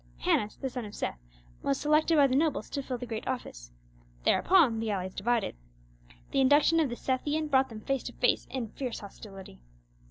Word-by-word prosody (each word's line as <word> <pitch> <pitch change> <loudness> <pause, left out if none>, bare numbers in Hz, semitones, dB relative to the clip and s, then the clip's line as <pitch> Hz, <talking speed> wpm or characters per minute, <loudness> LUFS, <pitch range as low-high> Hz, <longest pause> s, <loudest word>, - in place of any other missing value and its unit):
Hannas, 210 - +1
the 270 - -3
son 250 -1 -5
of 210 -1 -9
Seth, 60 - -3 0.4
was 140 - 0
selected 305 +2 +3
by 285 - +7
the 260 -1 +1
nobles 310 +2 0
to 280 - -2
fill 260 -2 -4
the 245 - -6
great 225 -2 -5
office; - - -5 0.5
thereupon 310 -12 +4
the 225 0 -2
allies 190 -2 -2
divided. 230 - 0 0.8
The 275 - +2
induction 290 +5 +5
of 305 -4 +2
the 240 - -4
Sethian 295 +5 -1
brought 265 0 +4
them 220 -2 -9
face 270 +2 -1
to - - -5
face - - +1
in 245 -5 -4
fierce 250 +1 -5
hostility. 195 - -11
255 Hz, 190 wpm, -29 LUFS, 215-280 Hz, 0.8 s, by